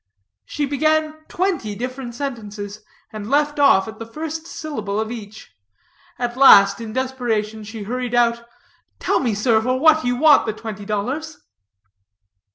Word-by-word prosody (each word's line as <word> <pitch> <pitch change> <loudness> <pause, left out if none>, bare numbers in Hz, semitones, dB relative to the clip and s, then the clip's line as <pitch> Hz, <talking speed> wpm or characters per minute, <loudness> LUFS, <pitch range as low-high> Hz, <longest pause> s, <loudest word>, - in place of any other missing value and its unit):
She 295 - -2
began 310 +2 +1
twenty 345 - -2
different 250 +1 -6
sentences, 215 -6 -6 0.3
and 215 0 -6
left 295 +1 +1
off 225 -8 +5
at 220 0 -9
the 225 - -6
first 320 +5 -6
syllable 215 -13 -4
of 220 +1 -3
each. 215 -3 -9 0.7
At 240 -1 -3
last, 200 -6 +7
in 225 -1 -6
desperation, 225 -4 -2
she 220 0 -8
hurried 245 +3 -3
out, 235 -1 +2 0.5
"Tell - - 0
me, 235 -6 -1
sir, 220 +1 +2
for 255 +3 0
what 315 +1 +5
you 245 0 0
want 295 -1 +5
the 220 - -1
twenty 215 -2 -8
dollars?" 260 +10 -3
240 Hz, 150 wpm, -21 LUFS, 215-285 Hz, 0.7 s, last